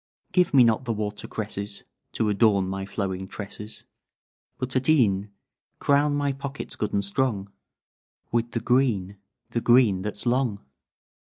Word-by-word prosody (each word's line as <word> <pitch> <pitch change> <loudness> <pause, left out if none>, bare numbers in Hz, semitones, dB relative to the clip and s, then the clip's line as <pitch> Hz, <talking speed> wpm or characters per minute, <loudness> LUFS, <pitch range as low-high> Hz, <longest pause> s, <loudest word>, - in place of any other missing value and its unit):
Give 180 -1 +3
me 135 -3 +7
not 115 +2 +2
the 115 - 0
water 105 -1 -4
cresses 100 -1 -4 0.3
To 110 - 0
adorn 100 -2 +3
my 95 0 -4
flowing 95 -2 -3
tresses, 105 +2 -8 0.7
But 130 0 -4
at 130 +3 +1
e'en 105 -9 +3 0.5
Crown 145 +1 +3
my 145 -1 0
pockets 140 +1 -6
good 105 -1 -2
and 100 -1 0
strong 100 -3 -1 0.8
With 120 0 0
the 115 - -1
green 115 -6 +1 0.3
The 120 - -1
green 120 -6 +5
that's 105 +3 -5
long.'" 120 - 0
110 Hz, 145 wpm, -25 LUFS, 100-130 Hz, 0.8 s, me